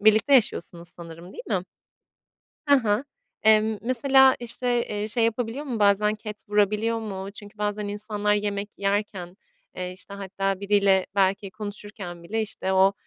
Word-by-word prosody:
birlikte 215 +6 +5
yaşıyorsunuz 175 -8 +1
sanırım, 170 +1 -10
değil - - -9
mi? 190 -5 0 1.0
Ha 280 -4 +5
ha. 210 +4 +1 0.4
Emm, 220 0 +4
mesela, 265 +2 +5
işte, 240 0 0
eee, 210 0 -3
şey 230 +1 +2
yapabiliyor 230 +4 -1
mu, 250 -6 -3
bazen 205 +1 +4
ket 210 -1 -8
vurabiliyor 210 +2 +2
mu? 195 -3 -5
Çünkü 205 0 -13
bazen 210 0 -2
insanlar 210 0 -1
yemek 205 0 -3
yerken, 195 -3 -2 0.4
eee, 180 0 -4
işte, 195 +2 -6
hatta 195 0 -2
biriyle 200 -2 +3
belki 195 0 +1
konuşurken 205 -4 -8
bile, 220 +5 -1
işte, 195 -3 -3
o, 190 +1 +5
210 Hz, 145 wpm, -25 LUFS, 195-220 Hz, 1.0 s, birlikte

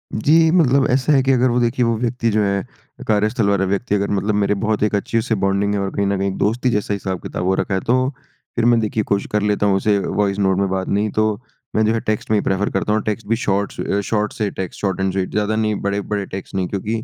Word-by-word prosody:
जी। 160 +8 +4
मतलब 140 -6 +3
ऐसा 130 +3 +2
है 135 - +4
कि 135 - +2
अगर 130 0 +3
वो 120 - +1
देखिए 120 +1 +1
वो 115 0 +1
व्यक्ति 120 -1 0
जो 105 0 +2
है 100 0 0 0.4
कार्यस्थल 105 0 +1
वाला 100 -1 +2
व्यक्ति 100 +3 -1
अगर 100 0 -1
मतलब 100 +1 0
मेरे 105 0 +2
बहुत 110 -1 0
एक 105 - +1
अच्छी 100 +3 -1
उससे 110 0 0
बॉन्डिंग 100 +1 +1
है 100 - 0
और 100 0 -1
कहीं 100 - +1
न 100 0 0
कहीं 95 0 -1
दोस्ती 120 +5 +1
जैसा 105 -1 -1
हिसाब-किताब 95 -2 -4
हो 95 - +2
रखा 100 - -2
है। 95 - +1
तो 130 +2 +2 0.5
फ़िर 115 - +1
मैं 120 -1 +5
देखिए 110 0 -1
कोशिश 100 0 -1
कर 105 - +1
लेता 105 0 +1
हूँ 100 -1 +3
उसे 100 +1 +2
वॉइस 100 0 -1
नोट 95 -2 +2
में 100 - +1
बात 95 0 -2
नहीं 105 +2 0
तो 110 0 +2 0.5
मैं 110 - +3
जो 110 - +2
है 115 - 0
टेक्स्ट 110 0 -3
में 110 - +4
ही - - +1
प्रेफ़र 95 +1 0
करता 100 +2 -1
हूँ। 110 - +1
टेक्स्ट 110 +1 -3
भी 115 - +2
शॉर्ट्स 100 -3 -2
अ, 100 - 0
शॉर्ट 105 +1 -1
से 105 -2 -1
टेक्स्ट 95 -2 -6
शॉर्ट 95 -2 -1
एंड 95 0 +1
स्वीट 95 -1 -2
ज़्यादा 105 +1 0
नहीं 110 -1 0
बड़े-बड़े 100 0 -2
टेक्स्ट 95 +1 -8
नहीं 95 -2 0
क्योंकि 110 +3 -3
105 Hz, 260 wpm, -20 LUFS, 100-115 Hz, 0.5 s, मैं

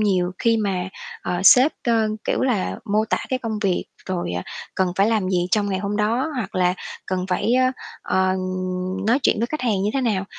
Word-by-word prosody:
nhiều 185 -4 +2
khi 230 -2 +3
mà, 190 -4 -1 0.3
ờ, 180 0 -2
sếp, 255 +8 +7
ơ, 225 -2 +2 0.2
kiểu - - 0
là, 240 -8 0
mô 215 0 +1
tả 220 - 0
cái 260 - 0
công 225 -3 -3
việc 195 -4 0 0.2
rồi, 180 - -2
à, 90 0 -2 0.3
cần 185 -1 +1
phải 195 - +4
làm 215 -4 +1
gì 180 -2 +1
trong 205 +1 +2
ngày 190 - 0
hôm 200 +1 -2
đó 230 +8 +1
hoặc 215 -6 -4
là 180 -1 +2 0.3
cần 185 -1 -2
phải, 185 +5 +1
ơ, 255 0 +4 0.4
ờ, 190 0 +1 0.7
nói 235 +4 +4
chuyện - - +3
với 230 - +1
khách 305 +5 -4
hàng 220 -6 +1
như 205 - +1
thế 270 - +1
nào. 210 -6 0
205 Hz, 215 wpm, -22 LUFS, 185-230 Hz, 0.7 s, sếp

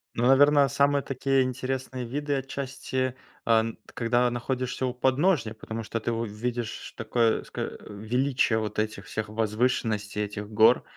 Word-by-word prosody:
Ну, 120 - +1
наверно, 145 +2 +6
самые 140 0 +2
такие 135 0 +1
интересные 130 0 -3
виды 145 +4 -2
отчасти, 130 -1 -3 0.3
а 115 -1 +5
н 115 0 -2 0.2
когда 120 +1 +2
находишься 130 +1 -2
у 125 - -2
подножья. 130 - +2
Потому 110 +1 -6
что 115 +1 -3
ты 120 - -2
увидишь 115 +1 -4
такое 115 0 +1
ско - - -7
э, - - -4
величие 120 +3 +1
вот 105 -1 -3
этих 110 0 -2
всех 110 -1 -4
возвышенностей, 110 -1 0
этих 105 0 -6
гор, 110 +1 +5
120 Hz, 150 wpm, -27 LUFS, 110-130 Hz, 0.3 s, наверно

